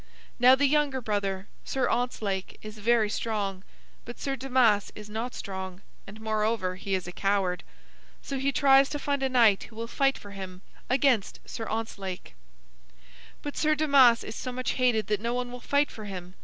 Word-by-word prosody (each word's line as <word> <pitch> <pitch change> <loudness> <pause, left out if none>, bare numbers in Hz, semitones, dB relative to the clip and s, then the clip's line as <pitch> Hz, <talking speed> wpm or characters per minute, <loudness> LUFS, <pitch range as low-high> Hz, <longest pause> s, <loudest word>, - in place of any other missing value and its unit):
Now 250 +2 +8
the 285 +2 +2
younger 285 -2 +2
brother, 200 -4 -2 0.2
Sir 265 - 0
Ontzlake, 215 -6 -2
is 215 0 -9
very 225 0 +3
strong, 205 -3 -2 0.4
but 240 - -9
Sir 275 -1 -2
Damas 250 -6 +2
is 210 0 -10
not 230 +4 -4
strong, 190 -1 -6 0.2
and 205 +3 -10
moreover, 215 -3 0
he 195 +1 -2
is 185 - -3
a - - -5
coward. 190 -2 0 0.6
So 275 -1 -4
he 275 +1 +1
tries 275 0 +5
to 295 - -3
find 285 -1 -1
a 265 - +1
knight 230 -6 +4
who 225 - -16
will 230 +1 -4
fight 275 +3 +1
for 205 - -11
him 190 -2 -8 0.3
against 255 -5 +2
Sir 225 - -6
Ontzlake. 200 -4 -5 1.1
"But 290 - -5
Sir 310 0 +2
Damas 275 -6 +5
is 220 - -7
so 255 - -4
much 255 0 -2
hated 245 -4 +2
that 210 0 -1
no 235 +2 -1
one 245 0 -3
will 250 - -7
fight 285 +4 +1
for 215 - -9
him. 185 -2 -7
225 Hz, 185 wpm, -28 LUFS, 200-260 Hz, 1.1 s, Now